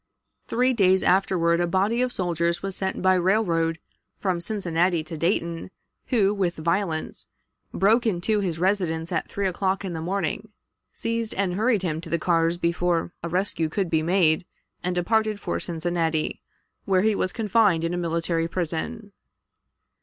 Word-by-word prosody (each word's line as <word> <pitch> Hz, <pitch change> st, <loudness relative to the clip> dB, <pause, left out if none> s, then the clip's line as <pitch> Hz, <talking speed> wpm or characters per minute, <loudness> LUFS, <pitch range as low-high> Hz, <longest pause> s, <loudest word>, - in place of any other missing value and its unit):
Three 250 Hz, +2 st, +2 dB
days 190 Hz, -4 st, +4 dB
afterward 175 Hz, -3 st, +3 dB
a 175 Hz, -, +1 dB
body 200 Hz, +7 st, +1 dB
of 255 Hz, 0 st, 0 dB
soldiers 170 Hz, -3 st, -1 dB
was 195 Hz, -1 st, -3 dB
sent 190 Hz, -1 st, -3 dB
by 185 Hz, 0 st, +5 dB
railroad 175 Hz, -3 st, +1 dB, 0.4 s
from 185 Hz, -3 st, -1 dB
Cincinnati 175 Hz, -4 st, 0 dB
to 160 Hz, +1 st, -7 dB
Dayton, 170 Hz, 0 st, -1 dB, 0.4 s
who, 205 Hz, -5 st, +3 dB
with 185 Hz, -4 st, -1 dB
violence, 170 Hz, 0 st, -2 dB, 0.4 s
broke 225 Hz, +5 st, +3 dB
into 210 Hz, +2 st, +1 dB
his 180 Hz, -5 st, -2 dB
residence 175 Hz, -3 st, 0 dB
at 175 Hz, -, -2 dB
three 200 Hz, -, -2 dB
o'clock 190 Hz, +1 st, -1 dB
in 180 Hz, -, -4 dB
the 160 Hz, -, -4 dB
morning, 195 Hz, +3 st, -2 dB, 0.4 s
seized, 230 Hz, -1 st, -3 dB
and 190 Hz, -2 st, 0 dB
hurried 215 Hz, 0 st, +1 dB
him 160 Hz, -3 st, -2 dB
to 170 Hz, -, -9 dB
the 170 Hz, -, +1 dB
cars 165 Hz, 0 st, +1 dB
before 170 Hz, 0 st, 0 dB
a 170 Hz, -, -4 dB
rescue 175 Hz, -3 st, 0 dB
could 185 Hz, +1 st, -2 dB
be 160 Hz, -1 st, +3 dB
made, 165 Hz, -1 st, +3 dB, 0.4 s
and 180 Hz, 0 st, -1 dB
departed 215 Hz, +3 st, +1 dB
for -, -, -2 dB
Cincinnati, 165 Hz, -2 st, -1 dB, 0.4 s
where 190 Hz, -1 st, +2 dB
he 220 Hz, 0 st, +3 dB
was 185 Hz, -2 st, 0 dB
confined 210 Hz, -6 st, +2 dB
in 165 Hz, +1 st, -1 dB
a -, -, -1 dB
military 165 Hz, -1 st, 0 dB
prison. 185 Hz, +6 st, -4 dB
180 Hz, 160 wpm, -25 LUFS, 170-200 Hz, 0.4 s, by